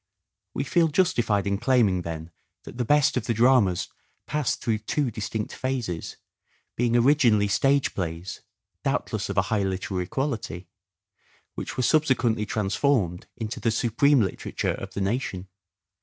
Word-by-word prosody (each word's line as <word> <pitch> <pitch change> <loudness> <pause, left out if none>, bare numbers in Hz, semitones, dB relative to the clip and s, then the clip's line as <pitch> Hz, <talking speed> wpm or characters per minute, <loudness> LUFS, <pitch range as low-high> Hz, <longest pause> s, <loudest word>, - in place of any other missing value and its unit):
We - - 0
feel 165 +4 +3
justified 145 - +1
in 100 0 0
claiming 115 -7 +3
then 80 0 -6 0.3
that 120 - -11
the - - +2
best 145 +1 +3
of 120 - -2
the 115 - 0
dramas 115 -7 +3 0.4
passed 150 -1 -1
through 110 -2 -1
two 125 +4 -1
distinct 110 0 -4
phases, 125 -10 -3 0.6
being 120 0 +2
originally 120 -5 +4
stage 135 +7 +2
plays 85 -1 -5 0.2
— - - -56
doubtless - - -1
of - - -4
a - - +4
high 105 - +2
literary 95 -1 -2
quality 115 -10 -3 0.4
— - - -37
which - - -6
were 130 - +1
subsequently 125 -7 +2
transformed 100 - 0
into 110 -1 -4
the 115 - +1
supreme 125 +4 +3
literature 95 - -2
of - - -8
the 100 - -2
nation. 95 -3 -2
115 Hz, 150 wpm, -25 LUFS, 95-130 Hz, 0.6 s, originally